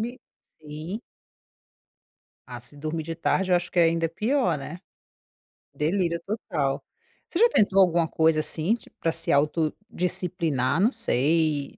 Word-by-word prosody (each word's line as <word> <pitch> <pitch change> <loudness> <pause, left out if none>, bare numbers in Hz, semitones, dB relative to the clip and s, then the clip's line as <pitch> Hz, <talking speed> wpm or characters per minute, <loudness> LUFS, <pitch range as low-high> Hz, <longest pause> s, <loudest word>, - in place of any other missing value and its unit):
Me 230 +2 -2 0.5
sim. 155 +8 -7 1.5
Ah, - - -7
se 145 - -6
dormir 155 +2 -4
de 165 0 -4
tarde 185 +3 0
eu 180 - +5
acho 175 +1 -3
que 180 - -2
é 170 - +7
ainda 165 0 +2
pior, 215 - 0
né, 165 +5 -7 1.0
delírio 170 +2 0
total. 155 -10 -2 0.5
Você 345 - -2
já 470 +1 +6
tentou 195 - +4
alguma 170 -2 +3
coisa, 160 -1 +2
assim, 160 +6 0
tipo, 235 - -17
pra 165 - +1
se 165 0 -1
autodisciplinar, 165 - 0
não 220 +5 +4
sei, 155 - 0
165 Hz, 145 wpm, -25 LUFS, 155-190 Hz, 1.5 s, é